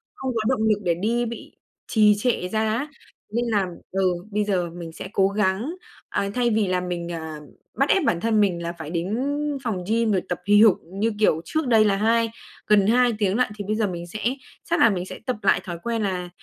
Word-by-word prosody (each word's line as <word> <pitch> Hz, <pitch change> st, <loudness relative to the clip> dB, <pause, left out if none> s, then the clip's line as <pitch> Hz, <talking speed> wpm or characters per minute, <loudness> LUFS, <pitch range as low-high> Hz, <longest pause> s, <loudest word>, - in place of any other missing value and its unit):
không 265 Hz, -1 st, -3 dB
có 220 Hz, -, +1 dB
động 250 Hz, -4 st, +1 dB
lực 210 Hz, -1 st, +2 dB
để 175 Hz, -2 st, +2 dB
đi, 230 Hz, +6 st, 0 dB
bị 235 Hz, 0 st, -8 dB, 0.3 s
trì 210 Hz, -2 st, +5 dB
trệ 210 Hz, -5 st, 0 dB
ra 220 Hz, +3 st, -1 dB, 0.2 s
á, 280 Hz, +6 st, -2 dB, 0.5 s
nên 240 Hz, +1 st, 0 dB
là 205 Hz, -5 st, +1 dB, 0.2 s
ừ, 190 Hz, -1 st, +2 dB, 0.2 s
bây 210 Hz, +1 st, +1 dB
giờ 180 Hz, -4 st, 0 dB
mình 170 Hz, -1 st, -8 dB
sẽ 185 Hz, -, -8 dB
cố 195 Hz, -1 st, +4 dB
gắng. 210 Hz, -, 0 dB, 0.3 s
À, 200 Hz, -, -1 dB
thay 245 Hz, -1 st, +2 dB
vì 215 Hz, -3 st, +1 dB
là 180 Hz, 0 st, 0 dB
mình, 175 Hz, -1 st, -4 dB
à, 160 Hz, -2 st, -5 dB, 0.4 s
bắt 275 Hz, -, +3 dB
ép 385 Hz, -, +4 dB
bản 170 Hz, -, +1 dB
thân 220 Hz, -2 st, +2 dB
mình 175 Hz, -4 st, +1 dB
là 170 Hz, +1 st, -3 dB
phải 160 Hz, -3 st, -8 dB
đến 180 Hz, +6 st, -2 dB, 0.5 s
phòng 195 Hz, -7 st, -2 dB
gym 225 Hz, 0 st, +2 dB
rồi 185 Hz, -3 st, +2 dB
tập 175 Hz, -, -2 dB
hì 205 Hz, +1 st, +6 dB
hục 220 Hz, -5 st, +6 dB
như 200 Hz, +6 st, -1 dB
kiểu 165 Hz, -6 st, +3 dB
trước 315 Hz, -4 st, -1 dB
đây 220 Hz, -3 st, +5 dB
là 200 Hz, -1 st, +3 dB
hai 225 Hz, +2 st, +2 dB, 0.4 s
gần 205 Hz, -2 st, +4 dB
2 245 Hz, +1 st, +4 dB
tiếng 200 Hz, +1 st, +1 dB
lận 250 Hz, -, +3 dB
thì 205 Hz, -, -5 dB
bây 215 Hz, -, 0 dB
giờ 215 Hz, -2 st, +1 dB
mình 175 Hz, -1 st, -6 dB
sẽ 215 Hz, +5 st, -7 dB, 0.5 s
chắc 340 Hz, -, +2 dB
là 230 Hz, -, +7 dB
mình 185 Hz, -3 st, -2 dB
sẽ -, -, -8 dB
tập 255 Hz, -, -1 dB
lại 195 Hz, -, +3 dB
thói 175 Hz, -2 st, -5 dB
quen 230 Hz, -1 st, -1 dB
là 180 Hz, -3 st, -2 dB
205 Hz, 235 wpm, -24 LUFS, 180-230 Hz, 0.5 s, là